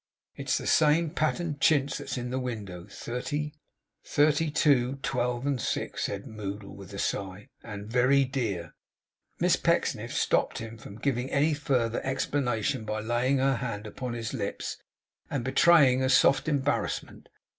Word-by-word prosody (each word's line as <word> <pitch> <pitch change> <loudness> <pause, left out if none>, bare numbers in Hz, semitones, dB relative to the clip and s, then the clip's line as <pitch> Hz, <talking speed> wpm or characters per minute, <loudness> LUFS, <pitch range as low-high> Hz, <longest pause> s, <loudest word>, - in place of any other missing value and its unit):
'If - - -21
it's - - +2
the - - -5
same 155 +1 +4
patterned 155 -2 -1
chintz 145 -3 +3
as - - -4
that - - -5
in 120 0 -4
the 130 - -1
window; 105 -8 -5
thirty 145 +8 -4 1.0
two, 140 -4 +3
twelve, 125 +1 -1
six,' - - -2
said - - -4
Moddle, 100 -1 -6
with 100 -1 -11
a 100 - -7
sigh. 100 0 -3
'And 105 -3 -7
very 130 +4 +3
dear.' 110 - -3 0.7
Miss - - +4
Pecksniff - - 0
stopped - - +1
him 115 0 -7
from 100 - -10
giving 125 +2 -1
any 150 +3 +2
further 125 -6 0
explanation 130 -3 -1
by 110 0 -3
laying 120 +5 +1
her 135 -1 +2
hand 115 -4 -4
upon 120 +4 -5
his 115 -2 -4
lips, - - -3 0.5
and 135 -4 -2
betraying 135 -1 +5
a 130 - +1
soft 135 +1 +4
embarrassment. 145 -2 -1
125 Hz, 150 wpm, -28 LUFS, 110-140 Hz, 1.0 s, betraying